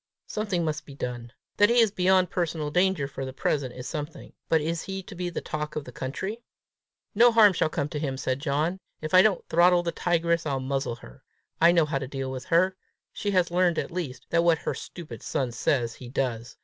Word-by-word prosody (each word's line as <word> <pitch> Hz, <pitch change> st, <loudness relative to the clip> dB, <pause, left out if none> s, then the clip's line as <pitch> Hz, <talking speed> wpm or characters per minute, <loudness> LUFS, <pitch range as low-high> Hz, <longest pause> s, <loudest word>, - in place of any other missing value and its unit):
Something 205 Hz, -6 st, -2 dB
must 155 Hz, -1 st, -3 dB
be 140 Hz, -, -10 dB
done. 120 Hz, -3 st, -5 dB, 0.3 s
That 205 Hz, +1 st, +6 dB
he 240 Hz, -, +3 dB
is 225 Hz, -3 st, +5 dB
beyond 185 Hz, -2 st, +3 dB
personal 160 Hz, -4 st, -2 dB
danger 180 Hz, -3 st, +2 dB
for 135 Hz, -1 st, -6 dB
the 130 Hz, 0 st, -5 dB
present 135 Hz, -2 st, -1 dB
is 125 Hz, 0 st, -7 dB
something; 150 Hz, 0 st, -6 dB, 0.2 s
but 160 Hz, -, +4 dB
is 160 Hz, +2 st, -2 dB
he 190 Hz, 0 st, -5 dB
to 195 Hz, -, -11 dB
be 180 Hz, -1 st, -3 dB
the 175 Hz, -, -4 dB
talk 150 Hz, 0 st, -4 dB
of 150 Hz, -, -2 dB
the -, -, -9 dB
country?" 190 Hz, -, -5 dB, 0.7 s
"No 235 Hz, +3 st, +6 dB
harm 215 Hz, -3 st, +7 dB
shall 165 Hz, -, +1 dB
come 145 Hz, -2 st, -2 dB
to 150 Hz, -, -4 dB
him," 135 Hz, -3 st, -2 dB
said 130 Hz, 0 st, -1 dB
John. 155 Hz, +5 st, -1 dB, 0.2 s
"If 155 Hz, +2 st, -6 dB
I 185 Hz, -, +9 dB
don't 200 Hz, -3 st, +1 dB
throttle 175 Hz, +1 st, +4 dB
the 170 Hz, -, -1 dB
tigress, 170 Hz, -1 st, +1 dB
I'll 135 Hz, -2 st, -1 dB
muzzle 135 Hz, -2 st, -2 dB
her. 130 Hz, +2 st, -15 dB, 0.4 s
I 170 Hz, +1 st, +7 dB
know 170 Hz, -2 st, +4 dB
how 145 Hz, -2 st, -1 dB
to 135 Hz, -, -5 dB
deal 135 Hz, -1 st, -4 dB
with 130 Hz, -1 st, -6 dB
her. 185 Hz, +3 st, +3 dB, 0.4 s
She 205 Hz, -, -3 dB
has 180 Hz, -3 st, +2 dB
learned 175 Hz, -1 st, +2 dB
at -, -, -2 dB
least, 165 Hz, -7 st, -5 dB
that 170 Hz, 0 st, +3 dB
what 170 Hz, -1 st, +4 dB
her -, -, -3 dB
stupid 170 Hz, -3 st, -9 dB
son 130 Hz, -3 st, -2 dB
says, 120 Hz, -1 st, 0 dB
he 125 Hz, 0 st, -11 dB
does! 120 Hz, -3 st, -3 dB
160 Hz, 225 wpm, -26 LUFS, 135-180 Hz, 0.7 s, I